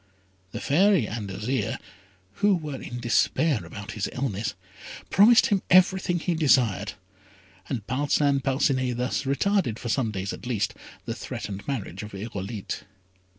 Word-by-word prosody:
The - - -5
Fairy 180 - +3
and 105 -2 -5
Azire, 115 +7 -2 0.6
who 205 -1 +5
were 150 -5 -5
in 120 - -6
despair 120 - +2
about 100 +5 -8
his 105 -1 -2
illness, 115 -5 -2 0.6
promised 225 +4 +7
him 200 -2 +2
everything 185 0 +4
he 175 +1 -1
desired; 120 - +2 0.8
and 115 -7 -3
Parcin 140 +2 +1
Parcinet 130 -2 +1
thus 125 +3 -1
retarded, 140 - +1
for 120 - -5
some 120 -1 +1
days 95 -2 -3
at - - -8
least, 110 -4 0 0.3
the - - -2
threatened 100 0 -6
marriage 110 -9 -4
of 105 -1 -8
Irolite. 100 0 -5
125 Hz, 140 wpm, -26 LUFS, 105-150 Hz, 0.8 s, promised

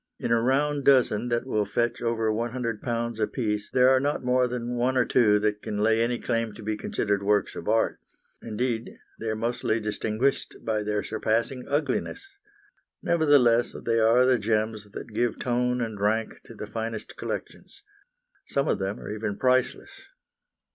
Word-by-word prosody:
In - - -3
a 115 -1 +4
round 140 +3 +1
dozen 125 -4 +3
that 120 +1 0
will 110 -5 0
fetch 120 +4 -1
over 115 -2 0
£100 115 0 -2
apiece 105 -2 -1
there 125 0 +5
are 130 0 +5
not 145 +1 -1
more 125 0 +3
than 120 0 -4
one 125 +2 +1
or 125 - +4
two 105 -5 +4
that 105 0 -1
can 105 - -4
lay 110 +2 +3
any 120 +1 +1
claim 115 -3 -2
to 110 - -11
be 110 +1 -1
considered 105 -1 -1
works 105 +1 +1
of - - -7
art; 110 +1 +1 0.4
indeed, 115 +1 -3 0.2
they 115 - -3
are 110 - -1
mostly 115 0 -1
distinguished 110 +4 -1
by 110 -1 0
their 105 0 -1
surpassing 115 +3 -1
ugliness. 145 - -2 0.8
Nevertheless, 140 -8 +3
they 115 -1 +2
are 115 +3 +5
the 130 -2 +3
gems 110 -1 -1
that 110 +2 -9
give 120 0 0
tone 125 0 0
and 110 -3 -4
rank 110 +2 +1
to - - -12
the - - -6
finest 115 -1 -5
collections. - - -7 0.6
Some 140 0 0
of - - +1
them 95 +1 -3
are - - -7
even 105 -1 -3
priceless. 130 - +1
115 Hz, 170 wpm, -26 LUFS, 110-125 Hz, 0.8 s, there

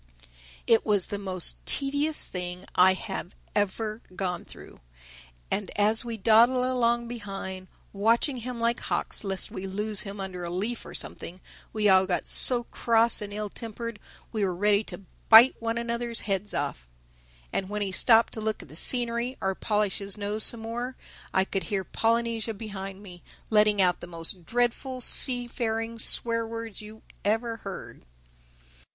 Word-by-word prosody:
It 225 - +4
was 205 -4 +2
the 205 - -3
most 185 -3 0
tedious 285 +2 +1
thing 180 0 -5
I 185 +1 +6
have 190 -3 -5 0.2
ever 215 +2 -1
gone 180 -2 -3
through. - - -13 0.7
And 200 -1 -1
as 215 +2 +3
we 230 -2 -5
dawdled 235 +4 +5
along 240 -2 +1
behind, 195 -5 -6 0.3
watching 230 +7 +2
him 245 0 -5
like 235 +1 +1
hawks - - -1
lest 195 -2 +1
we 195 - -6
lose 210 +2 -2
him 200 0 -7
under 185 -2 -5
a 170 - -4
leaf 210 +7 -3
or - - -9
something, 180 +2 -5 0.3
we 215 -1 +1
all 190 -1 +5
got 180 - 0
so 245 -2 +2
cross 230 -1 +1
and 205 -1 -6
ill 210 +1 -4
tempered 230 0 -7 0.3
we 215 -3 -1
were 185 -2 0
ready 205 +3 +3
to - - -8 0.3
bite 230 +4 +9
one 230 0 -1
another's 235 0 -1
heads 200 0 -2
off. 140 - -3 0.7
And 190 - -2
when 210 0 -2
he 195 - -3
stopped 225 +4 +5
to 220 - -4
look 215 0 -2
at - - -17
the 155 - -13
scenery 240 +5 +2
or 190 0 0
polish 210 0 0
his 200 0 -2
nose 210 +1 0
some 235 - +5
more, 240 +3 -4 0.4
I 190 - +2
could 195 -1 -3
hear 200 -3 -1
Polynesia 230 +1 -1
behind 195 -2 -7
me 180 -3 -12 0.3
letting 210 -1 +4
out 180 -2 +3
the - - -9
most 170 0 -6
dreadful 245 +2 -1
seafaring 230 -3 +2
swear 230 0 +2
words 230 -2 -6
you 215 +1 -12 0.2
ever 225 +2 0
heard. 195 -3 -9
215 Hz, 165 wpm, -27 LUFS, 195-235 Hz, 0.7 s, bite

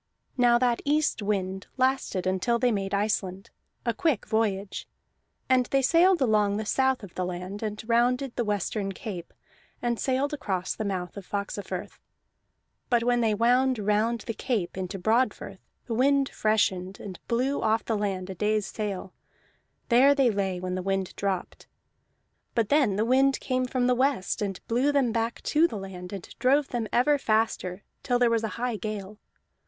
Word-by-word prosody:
Now 240 -2 +5
that 240 -1 +1
east 300 -3 +1
wind 190 -2 -2
lasted 260 -8 +1
until 190 +6 +1
they 245 +1 +2
made 195 -2 -2
Iceland 200 -2 -1 0.3
a 235 - +1
quick 280 0 0
voyage. 205 -3 -1 0.6
And 255 -1 +3
they 275 -1 +1
sailed 340 +4 +4
along 210 -3 +2
the 215 - -3
south 265 +1 +1
of 195 - -10
the 185 - -2
land, 180 +3 -5
and 215 0 -5
rounded 245 +2 +2
the 240 - 0
western 205 -1 -2
cape, 180 -3 -7 0.5
and 240 -1 -1
sailed 270 +2 0
across 190 -10 -2
the 215 - -4
mouth 185 -2 -3
of 195 - -8
Faxafirth. 200 0 -5 0.9
But 240 -2 +3
when 245 0 +2
they 220 -2 +2
would 250 +3 +3
round 215 +3 +1
the 230 - -4
cape 215 -7 -2
into 190 +1 -4
Broadfirth 225 +7 0 0.3
the 235 - -4
wind 275 +3 +3
freshened, 195 -3 0
and 190 -3 -8
blew 255 +4 0
them - - -2
off 220 +1 +2
the 225 - 0
land 195 -3 -2
a - - -4
day's 210 +2 0
sail; 195 -4 -4 0.8
there 265 +4 +6
they 265 -4 +4
lay 195 -3 -1
when 185 0 -3
the 185 - -2
wind 195 0 -2
dropped. 195 -3 -3 0.9
But 225 -3 +1
then 275 -9 +3
the 215 +3 +1
wind 265 +2 +3
came 255 -1 -1
from 250 0 0
the 250 - +4
west, 255 -7 0
and 195 -3 -2
blew 250 +5 +2
them 275 -5 +2
back 230 0 -2
to 315 +3 +3
the 220 - -6
land, 185 -2 -8
and 195 -3 -7
drove 275 +2 +3
them 235 -3 -2
ever 285 +4 +3
faster 215 -5 0 0.2
till 245 - +1
there 245 -1 +3
was 225 -1 +1
a - - 0
high 240 -2 -1
gale. 210 -1 -6
220 Hz, 175 wpm, -27 LUFS, 195-250 Hz, 0.9 s, there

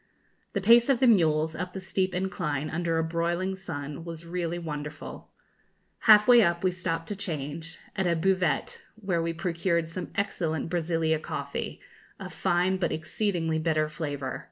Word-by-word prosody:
The 200 - -1
pace 235 +5 +6
of 265 -3 +4
the 260 - +4
mules, 160 -8 +4
up 180 +1 -4
the 190 - -4
steep 185 -1 -1
incline, 160 -6 -2
under 165 0 0
a 160 - +2
broiling 170 +3 -1
sun, 150 -5 -6
was 165 -1 -8
really 170 0 -2
wonderful. 150 -3 -6 0.8
Half 210 +1 +9
way 245 -1 +8
up 170 -3 +1
we 185 - +3
stopped 165 -2 -3
to 205 - -2
change, 160 -4 -5 0.2
at 190 -1 0
a 170 - +2
buvette, 185 +2 0
where 190 -6 -1
we 165 0 -1
procured 170 -1 -1
some 180 +2 -5
excellent 165 -6 -1
Brazilia 165 -2 +1
coffee, - - -5 0.4
of - - -7
fine 180 +2 +1
but 175 -3 0
exceedingly 165 0 -1
bitter 155 -1 +1
flavour. 145 -3 -4
170 Hz, 160 wpm, -28 LUFS, 160-185 Hz, 0.8 s, Half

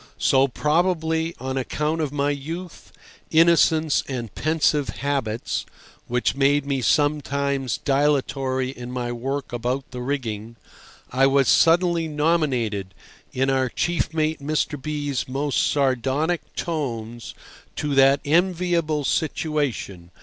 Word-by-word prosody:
So, 135 +1 +3
probably 160 +3 0
on 130 +1 -3
account 150 +5 -1
of 150 -3 -1
my 145 0 0
youth, 165 +5 -7 0.4
innocence, 160 -1 +4
and 120 -6 -5
pensive 150 -2 +1
habits 130 -6 -2 0.4
(which 125 +1 0
made 140 +1 +2
me 140 -2 -1
sometimes 140 -2 +1
dilatory 135 -2 0
in 125 -2 -8
my 125 -1 -3
work 135 +3 -4
about 125 +3 -2
the 125 -1 -6
rigging), 115 -4 -4 0.6
I 135 +2 +4
was 135 -1 +3
suddenly 170 0 +4
nominated, 135 - 0 0.4
in 135 +1 +1
our 130 -1 +1
chief 175 +5 -1
mate 155 0 0
Mr. 150 -1 -1
B—'s 145 -2 -3
most 140 +2 0
sardonic 140 +4 0
tones, 120 -8 -4 0.4
to 145 -1 -2
that 135 +1 +5
enviable 170 -1 +1
situation. 140 - -2
140 Hz, 115 wpm, -23 LUFS, 130-155 Hz, 0.6 s, that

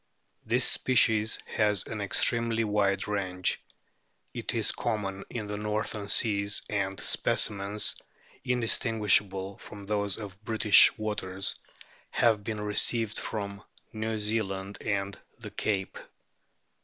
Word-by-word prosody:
This - - +2
species 110 -3 +3
has 105 -3 0
an 110 -2 -5
extremely 115 +3 +2
wide 100 -2 0
range; 95 -3 -1 0.7
it - - -4
is - - +1
common 100 -4 -3
in 115 -3 -5
the 105 0 -5
northern 105 0 -3
seas, 100 -1 +2
and 95 -2 -2
specimens 100 0 +1 0.5
indis 125 -3 +1
tinguishable 100 -4 +1
from 100 -1 -10
those 100 0 0
of 100 -1 -10
British 105 -2 +6
waters 100 -3 -2 0.6
have 110 -3 +2
been 105 0 -4
received 105 +1 0
from 100 -2 -5 0.3
New 110 0 -3
Zealand 100 -2 -2
and 100 -1 -3 0.2
the - - -9
Cape. 95 -3 -3
105 Hz, 115 wpm, -28 LUFS, 100-110 Hz, 0.7 s, British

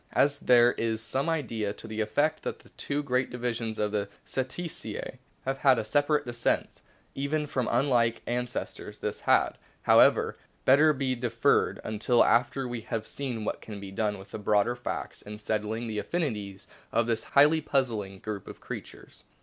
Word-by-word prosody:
As 145 0 +3
there 120 -1 +6
is 115 -2 -1
some 130 +7 -1
idea 115 -10 -1
to - - -11
the 110 0 -3
effect 145 +9 +1
that - - -4
the - - -19
two 145 +1 -3
great 130 -1 0
divisions 120 -2 -3
of 105 -1 0
the 100 -1 -1 0.2
Cetacea 135 +6 -4 0.3
have 135 +1 -1
had 135 -3 +5
a 110 - -1
separate 145 +4 +2
descent, 120 0 -1 0.3
even 150 +2 -1
from 130 -4 -1
unlike 120 -2 +2
ances 125 0 -2
tors, - - -10
this - - -3
had, - - +3 0.2
however, - - +5 0.3
better 150 +4 +6
be 135 -2 0
deferred 120 -2 +1
until 110 +3 +3
after 125 +3 +2
we 120 -1 -4
have 110 0 -4
seen 125 -6 -4
what - - -3
can 105 -2 -8
be 100 -1 -8
done 105 0 -1
with 95 0 -13
the - - -5
broader 105 +3 +2
facts 120 -1 -5
in 105 +1 -8
settling 110 +2 -2
the 110 -2 -3
affinities 105 - -3 0.3
of 115 - +2
this 115 -1 0
highly 150 +3 +7
puzzling 115 -10 -1
group 105 0 -6
of - - -9
creatures. - - -9
120 Hz, 175 wpm, -28 LUFS, 110-135 Hz, 0.3 s, highly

